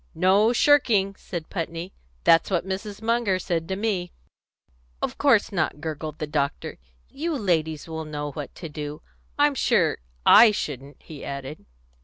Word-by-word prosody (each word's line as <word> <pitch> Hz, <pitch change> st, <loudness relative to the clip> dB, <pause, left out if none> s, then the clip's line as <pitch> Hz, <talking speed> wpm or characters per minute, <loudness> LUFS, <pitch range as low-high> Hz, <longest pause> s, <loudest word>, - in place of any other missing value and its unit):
"No 190 Hz, +6 st, +4 dB
shirking," 235 Hz, -7 st, +3 dB
said 170 Hz, -5 st, -7 dB
Putney. 170 Hz, 0 st, -4 dB, 0.3 s
"That's 165 Hz, -, +5 dB
what 185 Hz, -3 st, 0 dB
Mrs. 200 Hz, +2 st, -5 dB
Munger 230 Hz, -4 st, +1 dB
said 170 Hz, -3 st, -2 dB
to 190 Hz, -, -2 dB
me." 195 Hz, -4 st, -2 dB, 0.9 s
"Of -, -, -4 dB
course 245 Hz, -8 st, +4 dB
not," 160 Hz, -5 st, -1 dB
gurgled 155 Hz, 0 st, -5 dB
the 155 Hz, -, -3 dB
doctor. 145 Hz, -1 st, -3 dB, 0.3 s
"You 320 Hz, +3 st, -3 dB
ladies 160 Hz, -, -1 dB
will 160 Hz, -1 st, -5 dB
know 150 Hz, -1 st, -5 dB
what 145 Hz, +1 st, -7 dB
to 165 Hz, -, -7 dB
do. 150 Hz, -1 st, -7 dB, 0.3 s
I'm 290 Hz, 0 st, +4 dB
sure 270 Hz, -, +2 dB, 0.3 s
I 230 Hz, -, +9 dB
shouldn't," 140 Hz, -8 st, -5 dB
he 150 Hz, -3 st, -10 dB
added. 140 Hz, +2 st, -7 dB
175 Hz, 150 wpm, -25 LUFS, 155-210 Hz, 0.9 s, I